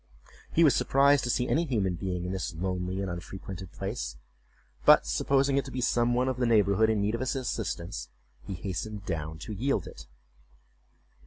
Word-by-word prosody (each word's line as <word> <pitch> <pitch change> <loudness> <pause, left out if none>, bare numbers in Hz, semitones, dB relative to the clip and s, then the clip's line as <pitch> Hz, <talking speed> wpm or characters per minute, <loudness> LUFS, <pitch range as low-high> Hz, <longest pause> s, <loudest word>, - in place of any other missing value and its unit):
He 170 - +4
was 150 - +6
surprised 140 0 +4
to - - -2
see 125 +1 +1
any 165 - +2
human 105 - 0
being 90 0 -3
in 90 - -3
this 95 -3 -3
lonely 90 +2 -2
and 100 - -2
unfrequented 95 +1 -7
place, 95 - -4 0.7
but - - +7
supposing 135 - +2
it 140 - +1
to - - -7
be 130 - -4
some 120 -1 +2
one 125 +1 +2
of 130 -1 -1
the 125 -1 +1
neighborhood 110 -1 +4
in 110 -2 +1
need 105 +2 0
of 115 - -1
his 130 +2 -1
assistance, 85 - -3 0.3
he 95 - -6
hastened 100 +3 -5
down 80 -3 -3
to 95 +6 -7
yield 130 +7 0
it. 65 0 -11
100 Hz, 185 wpm, -29 LUFS, 90-125 Hz, 0.7 s, but